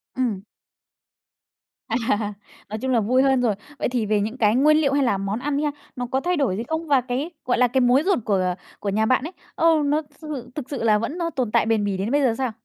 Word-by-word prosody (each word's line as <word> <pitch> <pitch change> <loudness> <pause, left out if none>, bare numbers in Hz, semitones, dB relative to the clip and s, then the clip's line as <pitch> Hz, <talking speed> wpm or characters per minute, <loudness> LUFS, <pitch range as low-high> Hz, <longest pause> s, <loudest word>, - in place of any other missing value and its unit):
Ừm. 235 -7 -1 1.5
À. 225 -3 -1 0.4
Nói 215 - -4
chung 260 0 -1
là 235 - +3
vui 250 +5 +2
hơn 265 -2 +3
rồi. 220 -5 +1 0.2
Vậy - - 0
thì 240 -3 -1
về 205 -1 +1
những 220 +5 -3
cái 215 -1 +3
nguyên 305 +4 +5
liệu 280 -3 +2
hay 280 -1 +3
là 205 -6 +2
món 195 +4 -2
ăn 285 +1 -1
đi 300 - 0
ha, 295 - +1 0.2
nó 250 -1 -3
có 260 +2 -1
thay 360 +1 0
đổi 245 -10 +1
gì 230 - -2
không? 320 0 -3
Và 275 -3 +4
cái, 260 +6 -3 0.2
gọi 245 - +1
là, 250 0 +4
cái 260 +2 +1
mối 250 +4 +4
ruột 390 -9 +2
của 185 -3 +1 0.2
của 200 - -3
nhà 215 +2 +1
bạn 255 +2 +2
ấy, 330 - -5 0.2
ờ, 330 - 0 0.2
nó 300 +2 +2 0.2
sư 310 - -9
thự 255 -5 -6
thực 280 -4 -6
sự 275 -5 -4
là 215 -2 +4
vẫn 285 +10 -3
nó 335 -1 -1
tồn 255 -8 -2
tại - - +3
bền 220 -2 +1
bỉ 200 -2 -1
đến 205 +6 -2
bây 290 0 +3
giờ 245 -4 +3
sao? 260 -3 -1
250 Hz, 265 wpm, -23 LUFS, 215-280 Hz, 1.5 s, nguyên